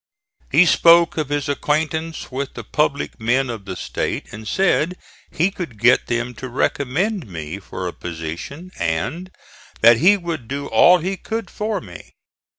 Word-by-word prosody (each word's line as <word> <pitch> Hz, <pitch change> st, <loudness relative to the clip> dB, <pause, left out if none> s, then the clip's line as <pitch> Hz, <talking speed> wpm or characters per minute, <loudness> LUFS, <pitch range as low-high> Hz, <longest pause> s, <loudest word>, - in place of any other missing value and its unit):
He 180 Hz, -, +6 dB
spoke 170 Hz, 0 st, +5 dB
of 155 Hz, -3 st, -2 dB
his 145 Hz, 0 st, -1 dB
acquaintance 155 Hz, +2 st, -2 dB
with 135 Hz, +1 st, -4 dB
the -, -, -6 dB
public 150 Hz, -4 st, -1 dB
men 120 Hz, +3 st, +1 dB
of 110 Hz, -4 st, -8 dB
the 95 Hz, -2 st, -5 dB
State, -, -, -3 dB
and 110 Hz, +1 st, -9 dB
said 180 Hz, -, +1 dB, 0.3 s
he 180 Hz, +5 st, +1 dB
could 170 Hz, -, -7 dB
get 120 Hz, +4 st, +4 dB
them 120 Hz, +1 st, -2 dB
to 130 Hz, -, -5 dB
recommend 150 Hz, -, -1 dB
me 80 Hz, 0 st, -6 dB
for 95 Hz, -1 st, -6 dB
a 85 Hz, -, -5 dB
position 85 Hz, -, -7 dB
and 95 Hz, -, -2 dB, 0.5 s
that 115 Hz, +1 st, +7 dB
he 190 Hz, -, +5 dB
would 165 Hz, -, -5 dB
do 140 Hz, +2 st, -4 dB
all 175 Hz, +10 st, +6 dB
he 190 Hz, +3 st, -3 dB
could 225 Hz, +3 st, -5 dB
for 210 Hz, -1 st, -2 dB
me. 90 Hz, -6 st, -12 dB
140 Hz, 160 wpm, -21 LUFS, 110-170 Hz, 0.5 s, that